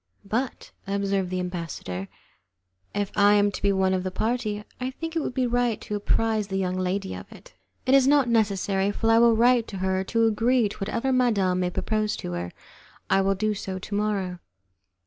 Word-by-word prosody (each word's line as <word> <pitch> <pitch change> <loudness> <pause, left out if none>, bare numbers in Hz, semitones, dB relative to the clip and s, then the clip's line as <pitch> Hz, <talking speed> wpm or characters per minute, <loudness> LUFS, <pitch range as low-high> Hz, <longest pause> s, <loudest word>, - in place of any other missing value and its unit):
"But," 240 +6 -3 0.2
observed 195 -1 0
the 185 0 -2
ambassador, 165 - -5 0.8
"if 205 -1 -2
I 205 0 +5
am 205 0 +3
to - - -7
be 200 - +3
one 190 -1 +2
of 185 - 0
the 185 - -3
party, 215 +1 -2 0.2
I 255 0 -2
think 325 +5 -6
it - - +2
would 265 - -4
be 255 - +1
right 245 -2 +1
to - - -6
apprize 215 +1 0
the 195 -1 -2
young 185 -1 -1
lady 185 +1 -2
of - - -9
it." - - -15 0.3
"It 255 - +3
is 270 -1 +6
not 285 -2 +4
necessary, 200 -3 +1
for 225 +2 +1
I 225 - +6
will 235 -1 +5
write 240 0 +4
to 195 - -7
her 190 0 0
to 230 +3 +2
agree 225 +1 +2
to - - -9
whatever 230 +6 -1
madam 205 -8 +2
may 180 -1 0
propose 215 +3 -1
to - - -6
her. 85 0 -4 0.6
I 195 - +5
will 195 0 +1
do 215 +2 0
so 190 -2 -5
to 190 +2 -8
morrow." 200 -4 -1
205 Hz, 205 wpm, -25 LUFS, 190-230 Hz, 0.8 s, is